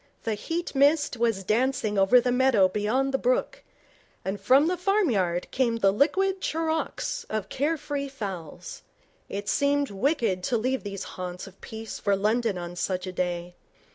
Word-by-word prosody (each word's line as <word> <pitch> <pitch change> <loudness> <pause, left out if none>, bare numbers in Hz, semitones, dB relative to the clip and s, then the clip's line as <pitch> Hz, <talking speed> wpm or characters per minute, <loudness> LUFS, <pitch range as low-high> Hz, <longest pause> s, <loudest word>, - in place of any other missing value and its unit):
The 225 - -1
heat 330 +11 -4
mist 290 +1 +3
was 225 -4 +1
dancing 230 +1 +1
over 195 +6 +6
the 245 +1 0
meadow 250 -6 +4
beyond 220 +8 0
the 270 - +1
brook, - - 0 0.6
and 195 +1 -3
from 265 +8 +5
the 365 - +1
farmyard 260 - +1
came 245 -3 +1
the 195 -4 +3
liquid 380 - +1
charawks 320 0 -2
of 215 -2 -3
care 300 +5 0
free 285 -1 -4
fowls. 195 - -7 0.5
It 200 +1 -5
seemed 285 -1 +1
wicked 215 - 0
to 240 - +1
leave 255 +4 -1
these 200 -2 -5
haunts 180 -1 -6
of 195 0 -15
peace 220 0 -7
for 200 -1 +2
London 215 +1 +1
on 175 0 -6
such 185 +1 -2
a 185 - -4
day. 175 -1 -2
230 Hz, 165 wpm, -26 LUFS, 195-280 Hz, 0.6 s, over